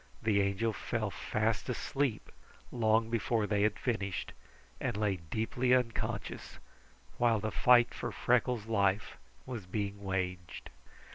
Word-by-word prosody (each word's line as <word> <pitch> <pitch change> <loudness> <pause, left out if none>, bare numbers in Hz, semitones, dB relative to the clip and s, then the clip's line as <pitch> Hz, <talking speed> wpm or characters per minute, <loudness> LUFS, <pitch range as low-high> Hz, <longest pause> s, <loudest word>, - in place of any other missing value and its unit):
The 105 -2 +2
Angel 100 +3 0
fell 110 -1 -2
fast 110 +4 -1
asleep 130 -1 -1 0.4
long 110 -1 +2
before 115 -1 +1
they 105 -1 +1
had 105 0 +2
finished, 100 -7 -2 0.5
and 120 -5 -2
lay 105 -3 +1
deeply 110 +9 +1
unconscious, 125 -2 -3 0.6
while 115 -2 +3
the 110 +1 -2
fight 125 -1 +5
for - - -4
Freckles' 125 -2 +1
life 100 -2 +1 0.3
was 115 -7 -6
being 100 +1 -3
waged. 90 -2 -3
110 Hz, 125 wpm, -32 LUFS, 100-120 Hz, 0.6 s, fight